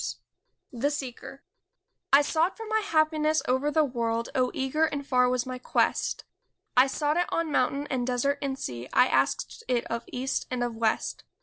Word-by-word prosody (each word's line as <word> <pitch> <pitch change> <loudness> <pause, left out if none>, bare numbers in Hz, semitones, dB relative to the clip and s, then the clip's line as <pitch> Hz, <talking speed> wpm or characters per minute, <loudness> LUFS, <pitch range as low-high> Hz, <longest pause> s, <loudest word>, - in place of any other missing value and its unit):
125 240 - -9
THE 285 - +3
SEEKER 270 0 -7 0.7
I 280 - +8
SOUGHT 325 +5 +1
for 450 - -7
my 440 0 +1
happiness 310 -5 +2
over 260 +4 +1
the 310 +1 +3
world, 235 -4 -1
Oh, 255 -1 +2
eager 270 +4 +1
and 285 -2 -3
far 250 -2 +3
was 250 0 0
my 255 -1 -5
quest; - - 0 0.5
I 255 +2 +6
sought 295 +3 0
it 355 - +2
on 330 -2 -1
mountain 275 +2 +1
and 250 -2 -1
desert 275 +3 0
and 270 -2 -2
sea, 120 - -6
I - - +6
asked 465 - 0
it 245 -2 0
of 235 0 -3
east 260 +2 -2
and 250 -1 -1
of 240 -1 -3
west. 225 -1 -1
265 Hz, 185 wpm, -27 LUFS, 250-305 Hz, 0.7 s, I